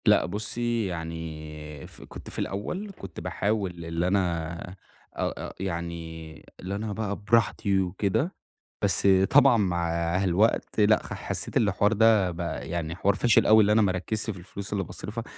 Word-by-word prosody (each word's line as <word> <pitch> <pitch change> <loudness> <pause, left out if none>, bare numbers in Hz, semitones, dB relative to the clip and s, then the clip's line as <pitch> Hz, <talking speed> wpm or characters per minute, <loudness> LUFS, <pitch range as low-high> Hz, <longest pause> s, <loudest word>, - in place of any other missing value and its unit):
لأ، - - +5
بُصي 115 +3 -2
يعني 80 -3 -6
ف - - -16
كنت - - -10
في - - -7
الأول 180 - -3
كنت - - -8
باحاول 95 -5 -2
اللي 85 +1 -1
أنا 85 -3 0 0.5
أ - - -3
أ - - -10
يعني 85 -3 -5
اللي 95 +2 -4
أنا 105 0 -3
بَقى 105 -1 -2
براحتي 105 -2 +2
وكده، 100 - -1 0.5
بس - - +2 0.2
طبعًا 135 -3 +6
مع 90 -5 0 0.3
الوقت 100 +5 +1
لأ 110 +1 +4
خ - - -7
حسيت - - -3
اللي 105 -2 +3
الحوار 100 +3 +2
ده 110 -4 +4
بَقى 80 -6 -5
يعني 85 -1 -3
حوار 100 +2 +2
فاشل 120 +3 +4
أوي 110 0 +7
اللي 105 0 +3
أنا 110 +1 +5
ما 100 -3 +3
اركِّزش 105 +5 -2
في 95 -4 -4
الفلوس 100 +3 -7
اللي 100 -1 0
باصرفها، 115 +4 -6
95 Hz, 165 wpm, -27 LUFS, 85-110 Hz, 0.5 s, أوي